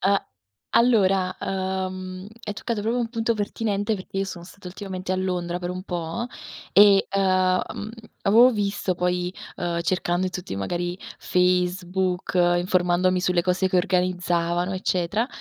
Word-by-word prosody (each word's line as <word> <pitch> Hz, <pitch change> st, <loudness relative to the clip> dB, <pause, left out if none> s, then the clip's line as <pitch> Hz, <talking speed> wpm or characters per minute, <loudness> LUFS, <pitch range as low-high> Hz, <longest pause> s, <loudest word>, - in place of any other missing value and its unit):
A 195 Hz, +1 st, +2 dB, 0.5 s
allora, 195 Hz, -6 st, +3 dB
uhm, 185 Hz, -1 st, -3 dB, 0.2 s
hai 210 Hz, -, -3 dB
toccato 225 Hz, 0 st, -3 dB
proprio 225 Hz, +4 st, 0 dB
un 235 Hz, -2 st, -1 dB
punto 230 Hz, 0 st, 0 dB
pertinente 205 Hz, 0 st, -1 dB
perché 190 Hz, +1 st, -6 dB
io 195 Hz, -, +1 dB
sono 175 Hz, -3 st, -7 dB
stata 190 Hz, +1 st, -14 dB
ultimamente 185 Hz, -1 st, -6 dB
a -, -, 0 dB
Londra 180 Hz, -2 st, -2 dB
per 180 Hz, 0 st, -4 dB
un 180 Hz, 0 st, -5 dB
po' 175 Hz, +4 st, -3 dB, 0.5 s
e, 200 Hz, 0 st, +7 dB
uhm, 195 Hz, 0 st, +2 dB, 0.5 s
mhmm, 210 Hz, -, -6 dB, 0.3 s
avevo 230 Hz, +5 st, +6 dB
visto 200 Hz, -3 st, -1 dB
poi, 180 Hz, +1 st, -1 dB, 0.2 s
uhm, 170 Hz, -1 st, -2 dB
cercando 175 Hz, +1 st, 0 dB
in 185 Hz, -, -4 dB
tutti 185 Hz, -, -5 dB
magari 175 Hz, -, -2 dB, 0.2 s
Facebook, 180 Hz, 0 st, 0 dB
informandomi 180 Hz, +1 st, +2 dB
sulle 180 Hz, -2 st, +2 dB
cose 185 Hz, +1 st, +1 dB
che 185 Hz, -, +1 dB
organizzavano, 180 Hz, -1 st, +1 dB
eccetera, 185 Hz, +4 st, 0 dB
185 Hz, 145 wpm, -24 LUFS, 180-195 Hz, 0.5 s, e